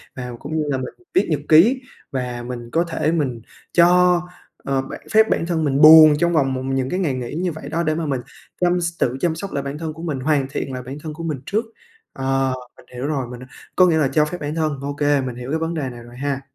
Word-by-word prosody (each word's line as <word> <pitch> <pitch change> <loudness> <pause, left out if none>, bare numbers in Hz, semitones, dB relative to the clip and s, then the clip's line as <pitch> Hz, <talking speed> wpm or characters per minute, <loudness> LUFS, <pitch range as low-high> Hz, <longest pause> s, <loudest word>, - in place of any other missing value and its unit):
và 125 -1 -6
cũng 155 +3 -4
như 155 - +1
là 135 - 0
mình 130 - -5 0.2
viết 370 - +3
nhật 150 -3 0
ký 220 +12 +6 0.3
và 125 -2 -3
mình 120 -2 -6
có 165 - +2
thể 165 -2 -1
mình 135 -8 -1 0.3
cho, 180 0 +5 0.4
ờ, 135 -1 0
bản 135 - -8
phép 220 0 +5
bản - - +1
thân 165 -2 -1
mình 140 -1 +1
buồn 155 0 +10
trong 170 0 +2
vòng 135 -4 +2
một 130 - -3
những 135 -1 -1
cái 180 - -1
ngày 160 -8 0
nghỉ 125 -1 -5
như 180 +1 -1
vậy 155 - -8
đó. 170 - -1
Để 155 -1 0
mà 165 0 -2
mình 135 -4 -1 0.4
chăm 180 0 +2
s 170 0 -2
tự 125 +1 0
chăm 165 -2 +1
sóc 195 +4 -6
lại 140 - -2
bản 140 +1 -5
thân 160 0 -4
của 165 +2 -10
mình, 150 -6 -3
hoàn 140 0 +1
thiện 135 -1 -4
lại 125 - -5
bản 130 +3 -7
thân 155 -2 -5
của 165 +2 -8
mình 155 -5 -3
trước, 220 +3 -1 0.5
ờ, 135 0 0 0.2
mình - - -18
hiểu 125 +3 -4
rồi, 140 -5 -2
mình, 125 +1 -9
à, 130 - -13 0.3
có 185 - +6
nghĩa 160 -2 +3
là 150 - +3
cho 150 +3 +2
phép 165 +4 -5
bản 150 +1 -3
thân 155 -4 -1
ô 140 +1 -3
kê 145 -1 +2
mình 125 -2 -4
hiểu 125 +1 -7
cái 160 - 0
vấn 165 +1 -2
đề 145 -5 -3
này 120 -1 -10
rồi 120 +1 -13
ha. 140 0 -2
150 Hz, 270 wpm, -21 LUFS, 130-165 Hz, 0.5 s, buồn